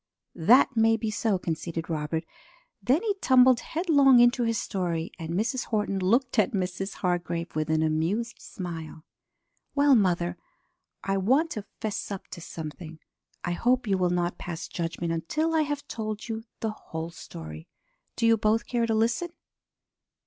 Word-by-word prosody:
"That 240 +10 +5
may 225 0 +4
be 220 -1 -2
so," 215 -2 +1
conceded 165 -1 -4
Robert. 160 0 -2 0.6
Then 275 - +2
he 430 -3 +1
tumbled 255 -2 +6
headlong 285 -7 +4
into 240 +1 +5
his 230 -1 +1
story, 175 -5 -2
and 160 -1 -6
Mrs. 235 +5 0
Horton 210 -3 -1
looked 235 +6 +2
at 225 +4 +2
Mrs. 195 0 -2
Hargrave 175 -2 -2
with 155 0 -1
an 160 0 +2
amused 165 +10 -1
smile. 165 -5 -7 0.7
"Well, 285 -1 +5
mother, 180 -6 +2 0.7
I 195 0 0
want 265 - +2
to 210 -2 -5 0.2
'fess 215 -2 -3
up 200 -2 -6
to 170 - -8
something. 160 0 -8 0.5
I 175 - -1
hope 245 +8 +1
you 200 -3 +2
will 180 -1 +2
not 175 0 -1
pass 170 -2 -5
judgment 170 0 -3
until 305 - -1
I 320 - +3
have 290 -1 -3
told 215 -2 -4
you 225 0 -4 0.2
the 220 - -1
whole 165 -5 -7
story. 80 - -9 0.5
Do 230 - 0
you 230 0 +5
both 220 +2 +1
care 235 -2 0
to 225 - +1
listen?" 235 +10 +1
205 Hz, 160 wpm, -27 LUFS, 170-240 Hz, 0.7 s, tumbled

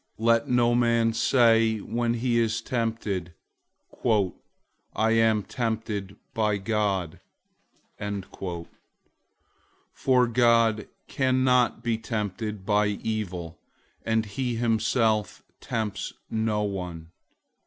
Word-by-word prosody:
001:013 110 - -4
Let 115 0 +4
no 120 -1 +3
man 115 -1 +2
say 115 -1 +4
when 115 +3 -1
he 120 0 +1
is 115 -1 +1
tempted, 110 -8 -2 0.7
"I 110 +1 -2
am 115 -2 +3
tempted 110 -4 -3 0.2
by 105 -4 +1
God," 95 -5 -1 2.7
for 125 -2 +3
God 115 -2 +3 0.2
can't 130 -2 +2
be 115 -2 0
tempted 105 -2 -4
by 105 0 +3
evil, 100 -5 -4 0.4
and 110 0 +1
he 120 +4 -3
himself 110 -2 +1 0.2
tempts 110 -4 -3 0.2
no 110 -1 0
one. 90 -5 -5
110 Hz, 90 wpm, -26 LUFS, 105-115 Hz, 2.7 s, Let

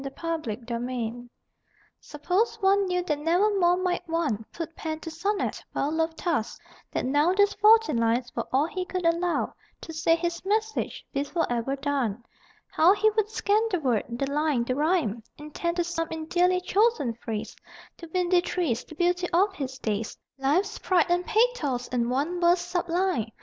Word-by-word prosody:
THE 275 - -5
LAST 255 -9 -3
SONNET 240 0 -4 0.7
Suppose 360 +11 -1
one 395 0 +3
knew 360 0 0
that 300 -4 -1
never 360 +7 +2
more 350 0 +4
might 365 -1 0
one 300 -10 0
Put 330 -1 -6
pen 315 -1 -4
to 325 - -6
sonnet, 395 +5 -2
well 285 - 0
loved 320 0 -1
task; 295 -10 -2 0.3
that - - -2
now 290 +7 +3
These 405 +1 +3
fourteen 430 - +5
lines 230 +1 0
were - - -3
all 270 +3 +3
he 365 +3 -3
could 365 -1 -4
allow 340 +1 +1 0.3
To 325 - -8
say 325 +1 +3
his 340 0 -3
message, 435 +3 -1
be 275 - 0
forever 270 -5 -1
done; 270 -6 -2 0.5
How 350 +5 +5
he 435 +1 +3
would 425 -1 0
scan 425 -1 +1
the 365 -5 0
word, 250 -8 0
the 240 +3 -2
line, 295 -4 +1
the 255 - -1
rhyme, 295 - +1 0.2
Intent 320 +3 -4
to 350 - +2
sum 335 -1 -2
in 320 -1 -5
dearly 360 +2 +2
chosen 405 - +2
phrase 225 -2 -5 0.4
The 335 - -10
windy 360 0 +2
trees, 320 -10 -1
the 315 - -13
beauty 355 +1 +1
of 385 +4 +3
his 265 -6 -5
days, 215 -2 -3 0.2
Life's 290 +9 +1
pride 360 -4 +3
and 355 0 +2
pathos 425 - +1
in 240 -1 0
one 295 +8 -1
verse 345 +1 +4
sublime. 350 - -1
330 Hz, 175 wpm, -26 LUFS, 270-365 Hz, 0.7 s, fourteen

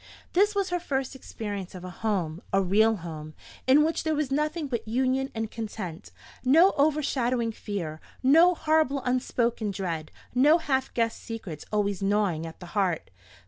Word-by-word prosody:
This 410 +3 +3
was 395 -2 0
her 355 - +1
first 270 -5 -2
experience 205 -7 -6
of 180 - -8
a 185 - -6
home, 180 -6 -2
a 195 - +3
real 215 +4 +3
home, 155 -2 -7 0.3
in 280 +3 +6
which 320 +1 0
there 315 -1 +1
was 295 -3 -1
nothing 300 +3 0
but 235 -4 -3
union 260 +3 +1
and 225 -1 -3
content; 195 - -6 0.3
no 325 +9 +6
overshadowing 265 -5 +1
fear, 170 -8 -5 0.2
no 330 +7 +6
horrible 310 -4 +1
unspoken 240 -3 0
dread, 175 -5 -3 0.2
no 290 +6 +6
half 265 -5 -1
guessed 230 -1 0
secrets 205 -10 -7
always 205 -2 0
gnawing 195 -5 +1
at 165 - -11
the 180 - -9
heart. 190 - 0
230 Hz, 160 wpm, -27 LUFS, 195-280 Hz, 0.3 s, in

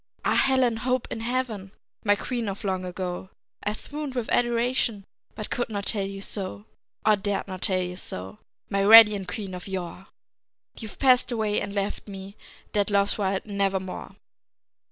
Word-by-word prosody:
Ah, - - +3
Helen 260 -4 +3
Hope 250 +2 0
in - - -3
heaven, 225 -5 -2 0.3
My 205 -1 +4
queen 235 0 -3
of 195 +3 -6
long 190 -2 -1
ago, 180 0 -4 0.3
I've 210 +1 -3
swooned 290 -2 -6
with 245 -3 -2
adoration, 240 -3 +1 0.3
But 215 - -6
could 240 - -1
not 200 -2 -3
tell 200 -3 0
you 195 0 -7
so, 105 - -5 0.4
Or 215 -1 +6
dared 200 0 -2
not 185 -1 -6
tell 185 -1 +2
you 180 0 -5
so, 95 - -6 0.3
My 200 - -1
radiant 210 -1 +8
queen 195 0 -5
of 180 +1 -7
yore! 185 0 -5 0.7
And - - -11
you've 220 -2 -8
passed 255 -2 +4
away 215 -3 0
and 200 0 -5
left 200 +1 -2
me 195 0 -8 0.4
Dead 205 0 +2
Love's 200 +1 +2
wild 195 -1 0
Nevermore! 195 -2 -2
205 Hz, 170 wpm, -26 LUFS, 190-230 Hz, 0.7 s, radiant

